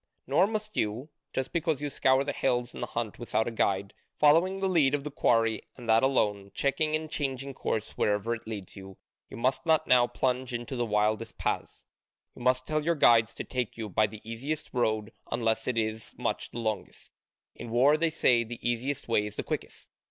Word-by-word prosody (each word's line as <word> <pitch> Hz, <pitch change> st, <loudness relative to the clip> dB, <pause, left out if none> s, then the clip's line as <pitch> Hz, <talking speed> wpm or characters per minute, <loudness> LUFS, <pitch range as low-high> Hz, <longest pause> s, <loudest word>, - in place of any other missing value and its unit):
Nor 195 Hz, -, +3 dB
must 215 Hz, -1 st, -4 dB
you 110 Hz, +8 st, -1 dB, 0.2 s
just 130 Hz, 0 st, -3 dB
because 165 Hz, -4 st, 0 dB
you 145 Hz, -1 st, -3 dB
scour 130 Hz, +1 st, +3 dB
the 145 Hz, -, -2 dB
hills 125 Hz, -3 st, 0 dB
in -, -, -8 dB
the -, -, -2 dB
hunt 115 Hz, -3 st, -4 dB
without 115 Hz, -2 st, 0 dB
a -, -, -2 dB
guide, 100 Hz, -3 st, 0 dB, 0.3 s
following 170 Hz, +6 st, +4 dB
the 195 Hz, -, +1 dB
lead 150 Hz, -7 st, +3 dB
of 140 Hz, -, -4 dB
the 150 Hz, -, -5 dB
quarry 115 Hz, -5 st, +2 dB, 0.2 s
and 120 Hz, -2 st, -10 dB
that 110 Hz, 0 st, +5 dB
alone, 105 Hz, -7 st, +1 dB
checking 155 Hz, +2 st, +1 dB
and 155 Hz, 0 st, -3 dB
changing 140 Hz, -2 st, -3 dB
course 110 Hz, -4 st, -2 dB
wherever 105 Hz, +3 st, +1 dB
it 115 Hz, -1 st, -7 dB
leads 105 Hz, -4 st, -7 dB
you 95 Hz, -1 st, -11 dB, 0.3 s
you -, -, -9 dB
must 130 Hz, +2 st, 0 dB
not 160 Hz, -1 st, +3 dB
now 125 Hz, -1 st, +5 dB
plunge 125 Hz, -1 st, -1 dB
into 120 Hz, +3 st, -5 dB
the 120 Hz, -1 st, -1 dB
wildest 105 Hz, 0 st, 0 dB
paths: -, -, -3 dB, 0.5 s
you -, -, -12 dB
must 125 Hz, +1 st, +2 dB
tell 155 Hz, -1 st, -1 dB
your 170 Hz, +2 st, +2 dB
guides 115 Hz, -5 st, +5 dB
to -, -, -4 dB
take 125 Hz, -4 st, -3 dB
you 110 Hz, -2 st, -4 dB
by 105 Hz, +3 st, +3 dB
the 105 Hz, +1 st, -12 dB
easiest 140 Hz, +7 st, -4 dB
road 110 Hz, -3 st, 0 dB, 0.2 s
unless 115 Hz, -1 st, 0 dB
it 125 Hz, -2 st, 0 dB
is 110 Hz, 0 st, -2 dB
much -, -, -2 dB
the -, -, -9 dB
longest. 110 Hz, -4 st, -4 dB, 0.4 s
In 120 Hz, -, -8 dB
war, 130 Hz, +6 st, +5 dB
they 165 Hz, +1 st, +1 dB
say, 125 Hz, -7 st, +3 dB
the 120 Hz, +1 st, -7 dB
easiest 130 Hz, +4 st, -2 dB
way 105 Hz, -3 st, +2 dB
is 105 Hz, -, -7 dB
the -, -, -3 dB
quickest. -, -, -5 dB
120 Hz, 205 wpm, -29 LUFS, 110-140 Hz, 0.5 s, that